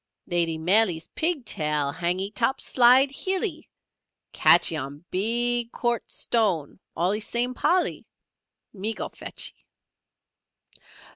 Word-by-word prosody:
"Lady 170 -2 0
Maley's 175 0 +2
pig 320 -6 -2
tail 150 -6 -1
hangee 180 +4 -2
top 250 +4 0
side 255 +2 +4
hillee. 370 +1 -2 0.6
Catchee 170 -1 +5
on 145 +2 -7
big 235 +4 0
quartz 240 -1 -3
stone 190 -12 -1 0.2
allee 185 +5 0
same 240 +3 +1
Polly, 355 +7 0 0.7
me 215 +2 -2
go - - -5
fetchee." - - -6
215 Hz, 100 wpm, -25 LUFS, 170-245 Hz, 0.7 s, Catchee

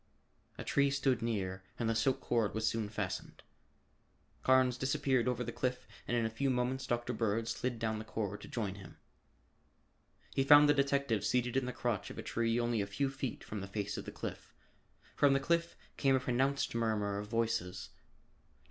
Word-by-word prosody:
A - - -5
tree 140 0 +3
stood 135 -3 +1
near 95 -5 -2
and 115 - -1
the 115 - +2
silk 130 +4 +1
cord 110 -4 0
was 110 0 0
soon 110 -2 -1
fastened. 100 -3 -4 1.0
Carnes 130 -1 +4
disappeared 130 -1 +1
over 125 0 0
the 120 - -4
cliff 125 +1 -2 0.2
and 120 - +1
in 115 - +1
a - - 0
few 135 +5 0
moments 130 +1 0
Dr. 120 +1 -1
Bird 110 0 0
slid 125 0 -2
down 110 -1 -1
the - - -5
cord 105 -2 -4
to - - -9
join 105 -5 -2
him. 95 -1 -12 1.4
He 135 - +2
found 145 +2 +8
the 145 - +6
detective 140 -6 +1
seated 125 -1 +1
in 135 -1 +1
the - - -2
crotch 120 -5 -2
of - - -9
a - - -5
tree 115 0 0
only 120 -2 +1
a 100 - -2
few 135 +7 -1
feet 135 -3 -4
from 105 -2 -5
the 100 - -5
face 100 0 -3
of - - -5
the - - -6
cliff. - - -7 0.6
From 145 -1 +5
the 135 - +3
cliff 170 +4 0 0.2
came 135 -1 +4
a - - +3
pronounced 130 +3 0
murmur 105 -3 0
of 105 - -6
voices. 105 -5 -1
Dr. - - -30
120 Hz, 195 wpm, -34 LUFS, 110-130 Hz, 1.4 s, found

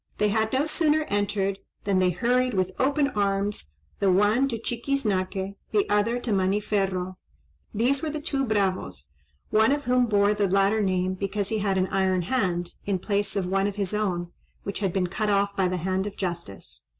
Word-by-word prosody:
They 210 - +2
had 220 +1 +1
no 270 +3 +2
sooner 310 -1 +2
entered, 200 -1 0 0.2
than 195 -2 +2
they 185 -1 +3
hurried 250 +6 +1
with 185 -1 +1
open 280 +2 +2
arms, 200 - -1 0.3
the 195 -2 +3
one 210 +8 +3
to 235 -4 -3
Chiquiznaque, 210 -6 -2 0.2
the 210 -2 +1
other 220 +4 +2
to 230 - -1
Maniferro; 190 -1 0 0.5
these 250 +6 +1
were 315 - -2
the 305 0 -3
two 285 -3 -1
bravos, 190 - -1 0.4
one 220 +3 +4
of 285 0 0
whom 250 -1 +2
bore 205 -1 +3
the 205 -1 +1
latter 195 +3 +3
name 185 -1 +1
because 200 +1 -2
he 220 - 0
had 195 -2 0
an 185 - +2
iron 190 -2 +1
hand, 180 -5 -1 0.2
in 200 -2 +1
place 205 +2 -1
of 195 -2 0
one 195 +2 +1
of 205 - -4
his 200 -1 -2
own, 180 -5 -1 0.3
which 200 - -4
had 195 -3 0
been 185 0 0
cut 210 +4 -2
off 200 0 +1
by 190 -2 +2
the 180 0 -1
hand 190 +3 -1
of 205 - -8
justice. 170 - -5
200 Hz, 190 wpm, -26 LUFS, 185-220 Hz, 0.5 s, one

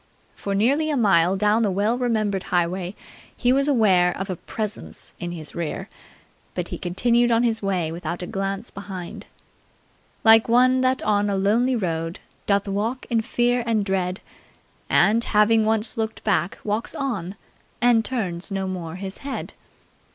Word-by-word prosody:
For 200 -1 -4
nearly 280 +10 +2
a 295 - 0
mile 190 -5 +4
down 210 +3 +2
the 215 - +2
well 205 +5 +1
remembered 215 -6 0
highway 180 +2 -1 0.4
he 245 0 +3
was 275 +1 +2
aware 190 -10 +3
of 195 +1 -4
a - - -2
Presence 215 +4 -3
in 175 0 -4
his 160 -3 -7
rear, 170 -3 -4 0.7
but - - -3
he - - -5
continued 235 +7 +2
on 230 +1 +3
his 225 -2 0
way 185 -5 -1
without 170 +1 -5
a - - -3
glance 195 +4 -3
behind. 190 -3 -8 1.0
"Like 225 0 +6
one 255 +2 +4
that 260 0 +1
on 205 -1 +2
a 200 - 0
lonely 225 +7 +2
road 165 -5 -2 0.3
Doth 200 0 +2
walk 215 +6 -2
in 230 -1 +2
fear 245 +2 +1
and 220 -3 +1
dread; 185 -1 -1 0.7
And, 230 +2 +4
having 215 +1 +3
once 220 +1 0
looked 220 -1 -3
back, 190 -4 0
walks 215 +2 -2
on 205 -9 -3 0.4
And 240 -2 +4
turns 195 -8 -3
no 195 -1 -2
more 180 -3 -5
his 190 +1 -6
head! 275 -1 -5
205 Hz, 160 wpm, -23 LUFS, 185-230 Hz, 1.0 s, Like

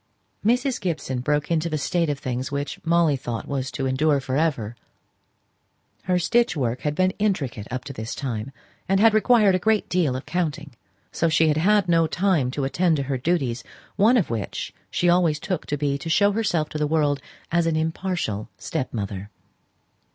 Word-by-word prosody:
Mrs. 245 +3 +1
Gibson 155 -8 -2
broke 150 +4 0
into 165 0 +1
the 155 - -1
state 165 +3 0
of 145 - -1
things 130 0 -4
which 140 0 -4
Molly 165 -2 +3
thought 120 -3 -5
was 135 -2 -2
to 135 - -3
endure 140 +2 +2
for 135 -1 -3
ever. 135 -8 0 1.3
Her 180 -1 +2 0.4
work 125 -4 -1
had 150 0 -1
been 185 +2 +2
intricate 140 - -1
up 130 +1 -4
to 140 - -7
this 110 +1 -5
time, 120 -2 -4 0.4
and 195 0 +3
had 220 +1 +6
required 215 -2 +4
a 185 - +2
great 220 +2 +1
deal 165 -8 +1
of 130 - -5
counting; 160 -4 -3 0.4
so 165 - +1
she 160 0 +3
had 150 - +1
had 200 +3 +3
no 165 -1 +3
time 170 -6 +1
to 140 +2 -3
attend 160 +4 +1
to 140 - -1
her 135 0 -2
duties, 130 -6 0 0.3
one 225 +5 +5
of 195 - 0
which 110 -3 -4 0.2
she 175 - 0
always 175 -3 +3
took 185 0 -3
to 150 - -1
be 140 -1 -1
to 150 - -6
show 200 +5 +4
herself 195 -8 0
to 155 - -5
the 150 - +1
world 145 -2 +1 0.3
as 170 0 +2
an 165 - +1
impartial 160 - -2
stepmother. 100 -5 -4
155 Hz, 185 wpm, -24 LUFS, 130-180 Hz, 1.3 s, had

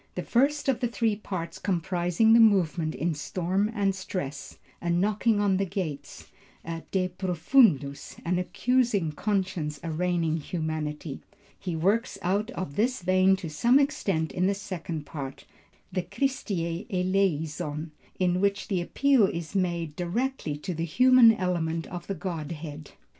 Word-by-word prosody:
The - - -3
first 280 +5 +1
of 265 -4 +2
the 245 - +1
three 230 -2 0
parts 180 -5 -5
comprising 180 +3 +2
the 230 - +7
movement 175 - +3
is 155 +2 -2
storm 190 +3 0
and 200 -3 +1
stress, 180 -7 -5 0.2
a 175 - -2
knocking 205 +5 +2
on 200 -2 +2
the 195 - +1
gates, 160 -7 -5 0.4
a 165 0 -4
De 185 -1 +1
Profundus, 175 - +2
an 180 +1 +1
accusing 225 -3 +1
conscience 185 -5 -2
arraigning 165 0 0
humanity. 155 -2 -4 0.4
He 180 -3 -3
works 200 +8 +1
out 200 +4 0
of 155 -6 -5
this 240 -2 +1
vein 185 +1 +4
to 185 -4 -6
some 235 - +4
extent 200 - 0
in 180 +1 +1
the 200 - +1
second 170 -6 -5
part, 135 -3 -7 0.5
the 185 - 0
Christe 270 +5 -2
eleison, 170 -4 -1 0.3
in 180 0 +1
which 200 +1 0
the 190 -4 +1
appeal 260 +3 +3
is 170 -1 -5
made 170 -5 -1
directly 180 - -2
to 180 +5 -4
the 165 0 -3
human 250 +7 +6
element 170 -5 -1
of 175 -1 -8
the 195 - -2
Godhead. 155 -4 -6
180 Hz, 145 wpm, -27 LUFS, 165-205 Hz, 0.5 s, the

